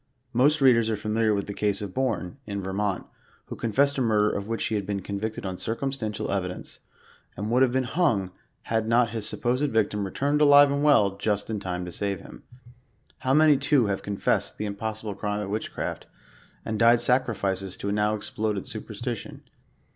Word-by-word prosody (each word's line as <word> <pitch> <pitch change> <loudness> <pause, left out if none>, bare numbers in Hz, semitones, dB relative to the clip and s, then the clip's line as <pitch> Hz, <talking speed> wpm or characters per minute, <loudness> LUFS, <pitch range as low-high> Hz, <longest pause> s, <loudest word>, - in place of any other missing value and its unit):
Most 145 +5 +3
readers 115 -4 +5
are 110 - +1
familiar 110 +1 +1
with 100 -1 0
the 100 - -6
case 100 -1 0
of 100 -3 -6
Bourne, 130 -4 -2
in 100 -2 -4
Vermont, 95 0 -2 0.4
who - - -7
Confessed 140 +5 +1
a - - +1
murder 105 -3 +3
of 100 0 -4
which 115 0 -2
he - - -2
had 105 -2 0
been 100 -1 -3
convicted 105 +2 -4
on 95 -1 -4
circumstantial 115 -2 -3
evidence, 90 -2 -4 0.6
and 105 +3 -3
would 125 +2 +3
have 130 -2 +4
been 130 +1 +1
hung, 120 - +1 0.3
had 110 -1 -1
not 115 0 +3
his 110 -2 -1
supposed 125 +4 0
victim 105 -2 +1
returned 140 +9 0
alive 145 -1 +7
and 140 +1 0
well, 105 -10 +4
just 105 +1 -1
in 105 - -2
time 90 -2 -4
to 90 - -7
save 100 0 -2
him. - - -12 0.8
How 130 +1 +1
many 155 -2 +6
too 140 -2 +3
have 100 -1 -1
confessed 100 -1 -1
the 105 - -3
im 100 - -3
possible 110 0 -4
crime 105 +1 -3
of 100 -1 -5
witchcraft, 110 - -4 0.6
and 110 -1 -3
died 115 +1 +6
sacrifices 100 -7 0
to 100 - -3
a - - 0
now 105 +1 +1
ex 105 0 -5
ploded 105 -3 -2
superstition - - -6
110 Hz, 190 wpm, -26 LUFS, 100-125 Hz, 0.8 s, alive